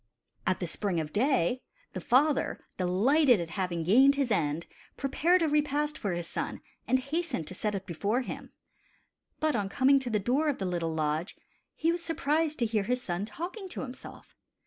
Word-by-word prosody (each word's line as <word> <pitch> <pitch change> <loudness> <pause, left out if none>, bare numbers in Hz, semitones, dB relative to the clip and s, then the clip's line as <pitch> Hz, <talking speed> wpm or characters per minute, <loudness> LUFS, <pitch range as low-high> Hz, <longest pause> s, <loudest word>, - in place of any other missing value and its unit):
At 185 - +2
the 180 - -3
spring 180 +1 0
of 155 -1 -4
day, 255 - +2 0.3
the - - -4
father, 280 +3 +2
delighted 235 - +4
at 170 -1 -4
having 180 -4 -2
gained 260 - +6
his 275 -4 0
end, 160 -4 0 0.3
prepared 335 +6 +2
a - - +3
repast 295 0 +1
for 200 - -2
his 175 0 -3
son - - -4 0.3
and 255 - +4
hastened 275 - -2
to - - -7
set 210 +2 -2
it 195 0 -4
before 200 +8 -1
him. - - -7 0.9
But 310 -3 +1
on 205 -3 -1
coming 275 +5 +4
to 260 -2 -4
the 220 - +1
door 265 +9 +1
of 285 - -2
rhe 195 - -2
little 170 -2 -1
lodge, 155 +4 -1 0.4
he 330 +2 +1
was 345 0 -2
surprised 315 -1 0
to 235 - +1
hear 215 -3 0
his 250 +3 -1
son 175 0 -2
talking 360 - -6
to - - -5
himself. 260 -1 -10
245 Hz, 190 wpm, -29 LUFS, 185-290 Hz, 0.9 s, gained